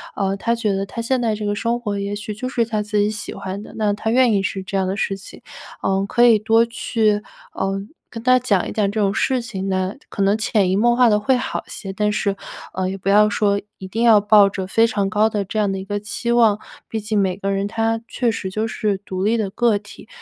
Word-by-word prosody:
呃， 195 0 0
他 235 +3 0
觉 215 -4 0
得 195 0 -2
他 230 - -5
现 250 +1 0
在 220 -2 +1
这 210 0 -5
个 205 - 0
生 235 +3 -1
活 205 -4 -3
也 200 +1 -3
许 210 +1 -5
就 255 +5 -5
是 235 -3 +1
他 215 -2 -2
自 210 0 -2
己 205 +1 +2
喜 215 - -6
欢 195 +1 -5
的， - - -11
那 210 -2 +1
他 210 +2 -3
愿 245 -1 +4
意 200 - +2
是 195 0 -3
这 195 - -6
样 190 -1 +1
的 195 +2 -2
事 195 - -1
情。 195 - -13 0.4
呃， 195 0 +1
可 240 +2 +4
以 230 -3 +6
多 225 +2 +3
去， 220 -2 0 0.3
呃， 195 0 -2 0.3
跟 230 -1 -8
他 255 0 +5
讲 205 -7 +1
一 - - -5
讲 205 -2 0
这 215 - -2
种 200 -1 +2
事 260 +4 +1
情 195 -5 -5
来， 185 +1 -1
可 200 - -4
能 200 +2 +3
潜 210 -4 +1
移 - - +2
默 235 +4 +3
化 245 -2 +5
地 210 0 +3
会 250 +5 +2
好 255 - -3
些。 195 -2 -7
但 210 +1 0
是 200 -1 0 0.4
呃 185 0 -1
也 195 - -4
不 190 - -9
要 210 +1 +5
说 200 -1 +1 0.2
一 190 - -7
定 220 +5 -3
要 225 -3 +7
抱 205 -1 +6
着 190 -1 -4
非 225 +5 +3
常 205 -3 -1
高 215 +1 +3
的 210 -2 -1
这 215 +3 -3
样 205 -2 +1
的 195 - -2
一 190 - -5
个 205 0 -2
期 215 +3 -3
望， 225 -3 +4 0.3
毕 220 - -3
竟 210 0 0
每 185 -2 +1
个 195 0 -2
人 195 +1 -1
他 225 +1 0
确 240 -2 0
实 190 -3 -4
就 215 +3 -2
是 210 -3 -1
独 190 -2 -5
立 225 +3 +2
的 205 -3 -1
个 235 -1 +2
体。 210 +1 -13
210 Hz, 280 characters per minute, -21 LUFS, 195-225 Hz, 0.4 s, 要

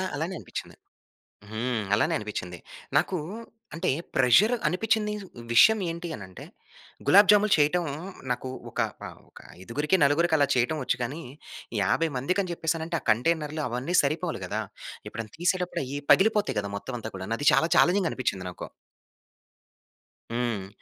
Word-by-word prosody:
అలానే 160 +6 -3
అనిపిచ్చింది. - - -8 0.8
హ్మ్. 115 0 -2
అలానే 105 - +2
అనిపిచ్చింది. 90 -5 -6 0.4
నాకూ 185 - +1 0.6
అంటే, 170 +3 -1 0.3
ప్రెజర్ 150 - +5
అనిపిచ్చిందీదు. 210 +1 0 0.3
విషయం 220 - +7
ఏంటి 170 +1 -5
అనంటే, 95 -2 -10 0.6
గులాబ్‌జాములు 205 +1 +6
చెయ్యటం 155 +4 +2 0.5
నాకు 125 +1 -3 0.2
ఒక - - -1 0.3
ఆహ్, - - -12
ఒక - - -15 0.2
ఐదుగురికి, 145 - 0
నలుగురికి 160 +4 +3
అలా 145 -1 +3
చెయ్యటం 125 +6 +1
ఒచ్చు, 125 -1 0
కానీ 140 +7 -4 0.6
50 165 - +1
మందికి 180 +10 0
అని 180 - -5
చెప్పేశానంటే, 165 0 -2
ఆ - - -28
కంటైనర్లు 155 +6 0
అవన్నీ 125 +9 -2
సరిపోవాలి 155 +3 -2
గదా! - - -2 0.5
ఎప్పుడన్నా 110 -2 -7
తీసేటప్పుడయ్యీ 175 -6 -1
పగిలిపోతాయి 210 - +3
కదా 100 - -6
మొత్తం 125 +5 -6
అంతా 110 0 -7
కూడాను. 95 +4 -3
అది 145 - -1
చాలా 135 +6 +3
ఛాలెంజింగ్‌గా 180 -1 +4
అనిపిచ్చింది 95 -8 -2
నాకు. - - -8 1.7
హ్మ్. 115 -5 -2
150 Hz, 135 wpm, -27 LUFS, 120-180 Hz, 1.7 s, విషయం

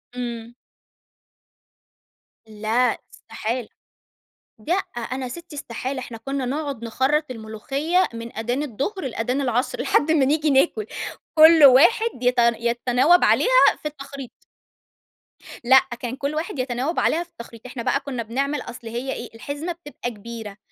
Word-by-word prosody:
إمم. 235 -1 -5 1.9
لأ 220 +4 0 0.2
استحالة. 235 +1 -5 1.0
لأ، 340 - +2 0.2
أنا 255 +2 -4
سِتّي 340 +2 -9
استحالة، 260 0 -4
إحنا 240 -2 -7
كُنّا 270 +3 -3
نقعُد 275 -2 -3
نخرّط 275 +6 +1
الملوخية 270 - -1
من 230 0 -8
آدان 245 +6 -1
الضهر 295 - -3
لآدان 250 +3 -2
العصر 250 0 -1
لحد 315 +2 +2
ما 290 -4 +4
نيجي 300 +2 +2
ناكُل. 340 +10 +2 0.5
كل 320 0 +8
واحد 345 - +6
يت 250 0 +3
يتَناوَب 240 +7 +3
عليها - - +5
في - - -3
التخريط. 275 -3 -10 1.2
لأ، 265 +2 +7 0.2
كان 245 0 -4
كل 280 +2 -3
واحد 315 0 -4
يتنَاوَب 255 +5 -1
عليها 335 +2 +1
في 350 - -24
التخريط. 235 -6 -12
إحنا 250 -2 -6
بقى 275 - +1
كُنّا 270 -4 -5
بنعمل 275 +5 -2
أصل 235 -1 -9
هي 240 +4 -3
إيه، 235 - -7
الحزمة 285 +8 -5
بتبقى 295 -7 -6
كبيرة، 220 -1 -9
260 Hz, 135 wpm, -23 LUFS, 235-295 Hz, 1.9 s, كل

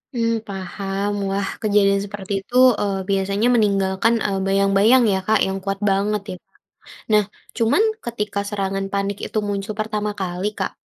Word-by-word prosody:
Mmm, 230 -1 +1 0.2
paham, 195 +1 -3 0.2
wah 195 0 -1
kejadian 200 -2 +3
seperti 200 -1 -6
itu, 225 +6 -12 0.2
eee, 195 -2 -1
biasanya 195 +3 +1
meninggalkan, 200 0 +2
eee, 195 -2 -1
bayang-bayang 200 +5 +4
ya 190 - +1
Kak 220 -1 +4
yang 190 0 -1
kuat 195 0 -2
banget 200 +1 +1
ya - - -5
Kak? - - -46 0.6
Nah 210 -1 +5 0.3
cuman 230 - +3 0.2
ketika 210 -3 -3
serangan 195 -1 -2
panik 200 0 -1
itu - - -4
muncul 200 +1 -3
pertama 210 -1 -2
kali 185 +3 -2
Kak, 190 - -3
200 Hz, 155 wpm, -21 LUFS, 195-210 Hz, 0.6 s, Nah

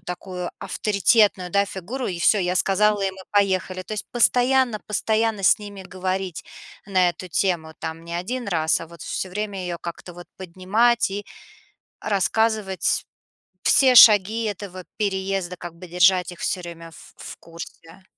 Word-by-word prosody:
такую 180 0 -6
авторитетную, 200 -2 +2
да, 200 +2 +2
фигуру 220 +8 -5
и: 175 -2 -4
"Всё, 205 +5 +4
я 180 -1 0
сказала, 205 +2 +2
и 195 - 0
мы 190 0 -13
поехали". 190 -2 0
То 200 - -9
есть 215 - -4
постоянно 245 -1 +2
постоянно 220 0 0
с 185 - +5
ними 205 -2 -9
говорить 185 -1 -4 0.4
на 185 -3 +2
эту 185 +1 -10
тему. 165 -3 -1
Там 160 0 -6
не 170 0 -8
1 225 +6 -4
раз, 160 -3 +1
а 165 - -7
вот 170 -1 -13
всё 190 - -4
время 200 0 -4
её 175 -1 -4
как-то 170 +1 -8
вот 175 0 -11
поднимать 195 +6 +1
и 205 +1 -5 0.8
рассказывать 210 -1 0 0.6
все 260 -2 +5
шаги 220 +1 +7
этого 195 -3 -6
переезда, 190 -3 -2
как 175 -1 -8
бы 180 +1 -11
держать 180 +1 +3
их 175 - -12
всё 180 - -2
время 165 -1 -10
в - - -15
в - - -9
курсе. 165 +2 -12
190 Hz, 160 wpm, -23 LUFS, 180-210 Hz, 0.8 s, шаги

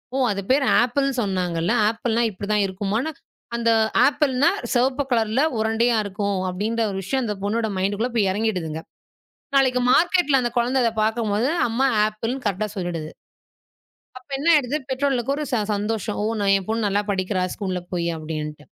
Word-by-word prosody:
ஓ - - 0
அது 200 -1 -2
பேர் 275 +1 +3 0.2
ஆப்பிள்ன்னு 275 +2 0
சொன்னாங்க 185 -5 -1
இல்ல. 175 - +1 0.2
ஆப்பிள்னா 230 +1 0
இப்டி 200 0 -7
தான் 210 -1 +3
இருக்குமானு. 205 +10 -2 0.4
அந்த 235 -1 +1 0.4
ஆப்பிள்னா 285 0 +2 0.2
சிவப்பு 255 +3 +2
கலர் 225 -2 +1 0.3
உருண்டையா 225 +2 +2
இருக்கும் 200 0 -2
அப்டின்ற 215 +5 -2
ஒரு 190 - -4
விஷயம் 265 +8 -1
அந்தப் 210 -4 -4
பொண்ணோட 220 +2 0
மைன்ட்குள்ள 205 +5 0
போய் 205 -4 +2
இறங்கிடுதுங்க. 180 -7 -2 0.8
நாளைக்கு 260 -2 +3
மார்க்கெட் 340 -4 +3
அந்த 240 -1 -1
குழந்த 245 +3 +1
அத 230 - +3
பாக்கும் 220 -1 0
போது 225 +5 +1 0.2
அம்மா 250 +4 +1 0.2
ஆப்பிள்ன்னு 225 +5 -4
கரெக்டா 205 +1 -1
சொல்லிடுது. 170 -4 -4 1.1
அப்ப 255 - -29
என்ன 295 +5 -1
ஆயிடுது? 285 -1 +2
பெற்றோர்களுக்கு 265 -1 0
ஒரு 305 - -3
ச - - +3 0.2
சந்தோஷம். 210 0 -2
ஓ! - - 0 0.3
என் 195 - -3
பொண்ணு 220 -1 0
நல்லா 200 +1 +1
படிக்கிறா 185 0 -1
ஸ்கூல 185 -3 -3
போயி 170 -1 -1
அப்டின்னு. 150 -1 -6
220 Hz, 160 wpm, -23 LUFS, 195-255 Hz, 1.1 s, பேர்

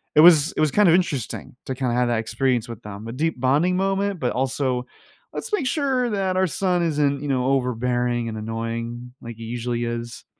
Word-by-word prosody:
it - - +6
was 160 -3 +7
it - - -5
was 155 -2 +3
kind 210 -3 +5
of 165 - +6
interesting 150 - -2
to 130 - -1
kinda 125 -2 -1
have 125 0 +2
that 120 -2 +1
experience 120 +1 0
with 115 -3 -8
them, 105 +1 -8
a 115 - -5
deep 155 +1 -1
bonding 150 +8 +2
moment, 195 0 0
but 125 -4 0
also, 130 -1 -1 0.5
"Let's 465 - -5
make 305 -11 +1
sure 265 -4 +1
that 190 -2 0
our 190 - +3
son 180 0 0
isn't, 145 -4 +1
you 145 - -4
know, 130 -2 +1
overbearing 125 -2 0
and 110 - -5
annoying 115 +2 -4
like 115 -1 -8
he 115 - -9
usually 120 +1 -2
is." 120 0 -5
130 Hz, 210 wpm, -23 LUFS, 120-170 Hz, 0.5 s, was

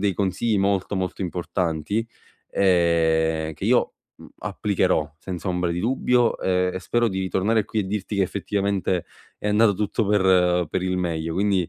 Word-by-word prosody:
dei 100 -1 +1
consigli 105 +4 0
molto, 100 0 0
molto 95 +1 -3
importanti, 90 +3 -2 0.5
ehm, 80 -3 +2
che - - -7
io, - - +2 0.2
mhmm, - - -14
applicherò 80 -7 0
senza 90 +2 -5
ombra 90 -1 0
di 85 +1 -2
dubbio, 125 +1 +2
e 90 0 +1
e - - -2
spero 120 +4 +1
di 95 -2 -2
tornare 105 +4 +1
qui 110 - -2
e 100 - -2
dirti 105 +1 -3
che 100 - +3
effettivamente 95 -2 -1 0.3
è 105 - -3
andato 105 0 +4
tutto 105 +2 -1
per 90 -3 +3
per 90 - -2
il 95 0 -1
meglio 80 -2 -2
quindi, 95 -2 +1
95 Hz, 165 wpm, -23 LUFS, 90-105 Hz, 0.5 s, andato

